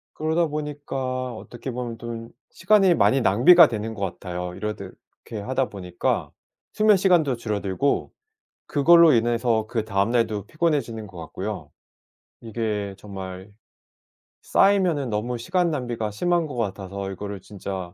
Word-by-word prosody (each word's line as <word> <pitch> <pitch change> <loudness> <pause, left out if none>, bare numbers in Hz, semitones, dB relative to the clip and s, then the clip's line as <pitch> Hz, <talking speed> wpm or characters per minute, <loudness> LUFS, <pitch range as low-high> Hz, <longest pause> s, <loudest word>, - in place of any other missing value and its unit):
그러다 160 +2 +1
보니까 135 -4 -4
어떻게 120 +4 -8
보면 120 -1 -5
좀 115 0 -7 0.2
시간이 195 -1 +4
많이 135 -4 +3
낭비가 135 - +7
되는 110 -2 -4
것 105 - -9
같아요. 90 -1 -5
이렇듯 100 -1 -6 0.3
이렇게 110 -3 -6
하다 130 +2 -1
보니까 90 -3 -2 0.4
수면 215 -1 +5
시간도 175 -8 +3
줄어들고 105 +3 -1 0.6
그걸로 165 +2 +6
인해서 115 -1 +1
그다음 110 -2 0
날도 110 -4 0
피곤해지는 130 -7 -1
것 95 -2 -13
같고요. 95 +5 -6 0.7
이게 105 -3 -3
정말 95 -1 -8 0.9
쌓이면은 180 -9 +2
너무 115 +3 -2
시간 175 +9 0
낭비가 120 -6 -3
심한 175 +9 +1
것 140 - -7
같아서 100 -3 -4
이거를 100 0 -6
진짜 95 -2 -7
115 Hz, 310 characters per minute, -24 LUFS, 100-145 Hz, 0.9 s, 낭비가